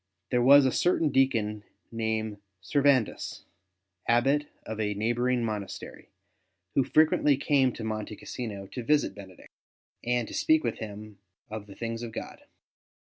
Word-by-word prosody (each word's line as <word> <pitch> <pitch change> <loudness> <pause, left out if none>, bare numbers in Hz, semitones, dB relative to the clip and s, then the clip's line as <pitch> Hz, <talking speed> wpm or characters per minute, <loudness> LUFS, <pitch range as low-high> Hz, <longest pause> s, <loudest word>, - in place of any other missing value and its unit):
There 125 - +3
was 140 +2 +8
a 130 - +3
certain 165 -1 +2
deacon 115 -6 +1 0.3
named 110 -2 -2 0.2
Servandus, 135 +3 +1 0.6
Abbot 135 +5 +3 0.2
of 110 0 -5
a 105 -1 -1
neighbouring 120 +3 +1
monastery, 105 -3 -6 0.6
who 135 - +3
frequently 150 0 +3
came 135 -2 +3
to 115 - -7
Monte 110 -1 -4
Cassino 105 -3 -6
to 125 - -7
visit 145 -2 +2
Benedict, 95 -2 -13 0.5
and 120 -1 0
to - - -9
speak 315 0 +3
with - - -2
him 105 -1 -8 0.3
of 110 -1 -6
the 100 - -12
things 115 0 -4
of 115 -2 -6
God. - - -7
115 Hz, 140 wpm, -28 LUFS, 105-135 Hz, 0.6 s, was